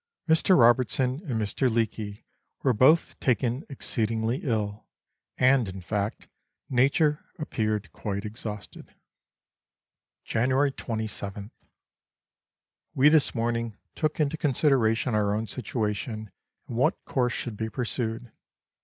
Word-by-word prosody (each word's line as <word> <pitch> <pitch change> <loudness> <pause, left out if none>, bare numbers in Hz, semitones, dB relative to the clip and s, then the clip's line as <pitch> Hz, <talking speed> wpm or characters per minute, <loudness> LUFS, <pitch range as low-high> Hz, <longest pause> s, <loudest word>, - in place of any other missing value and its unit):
Mr. 165 +3 +4
Robertson 125 +2 +3
and 120 -5 -1
Mr. 110 +5 0
Leake 110 -2 -2 0.4
were 130 - +4
both 135 +9 +4
taken 125 +1 +1
exceedingly 115 -2 -1
ill, 105 -4 -2 0.5
and, 130 -4 +4
in 95 +1 -7
fact, 100 +3 -3 0.4
nature 145 +4 +3
appeared 110 - -2
quite 100 0 -4
exhausted. 105 -1 -7 1.3
January 130 +4 +2
21th. 110 -3 -5 1.4
We 135 +3 +6
this 155 -3 +3
morning 115 -2 -1 0.2
took 155 0 -1
into 150 +1 +1
consideration 130 -5 +2
our 105 -1 +2
own 110 +1 -1
situation 110 -1 -3 0.4
and 115 - -5
what 130 - +1
course 125 -2 0
should 120 -3 -4
be 110 +1 -3
pursued. 115 0 -3
115 Hz, 110 wpm, -27 LUFS, 110-130 Hz, 1.4 s, We